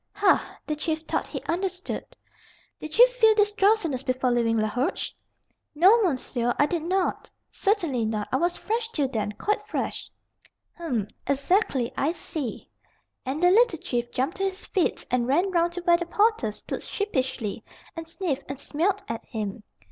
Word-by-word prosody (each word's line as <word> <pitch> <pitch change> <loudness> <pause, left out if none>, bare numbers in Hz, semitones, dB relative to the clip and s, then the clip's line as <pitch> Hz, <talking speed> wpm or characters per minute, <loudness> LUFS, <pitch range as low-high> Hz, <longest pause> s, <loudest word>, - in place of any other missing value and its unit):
"Hah!" 400 -1 +2
The 305 - -2
Chief 315 +1 -2
thought 320 - -2
he - - -6
understood. 370 +1 -3 0.7
"Did 310 +3 -6
you - - +10
feel 455 -3 +4
this 415 -1 +3
drowsiness 390 - +2
before 255 -1 0
leaving 230 -1 +2
Laroche?" 215 +5 -1 0.6
"No, 385 +9 +6
monsieur, 255 - 0
I 290 - +5
did 335 +2 -1
not. 365 +3 -1 0.2
Certainly 335 - +1
not. 215 -1 -2
I 260 - +2
was 345 +4 +1
fresh 450 +1 -2
till 295 -11 0
then 215 -4 -2
quite 415 - -1
fresh." 425 +1 -3 0.7
"Hum; 255 - -2 0.2
exactly; 280 - +1
I 305 +4 +1
see;" 295 -8 -5 0.6
and 290 +6 -2
the 355 - +7
little 445 -3 +5
Chief 240 -5 -2
jumped 265 +8 -2
to 390 - -2
his 385 0 -2
feet 370 -5 0
and 245 -1 +1
ran 345 +9 +2
round 345 -1 +2
to 360 - -4
where 345 -1 +4
the 345 0 -4
porter 420 - +2
stood - - -6
sheepishly, 260 - -2 0.3
and 330 -1 -6
sniffed 330 -4 -2
and 275 - -4
smelt 365 +9 -1
at 230 0 -4
him. 210 -1 -4
325 Hz, 165 wpm, -26 LUFS, 255-390 Hz, 0.7 s, you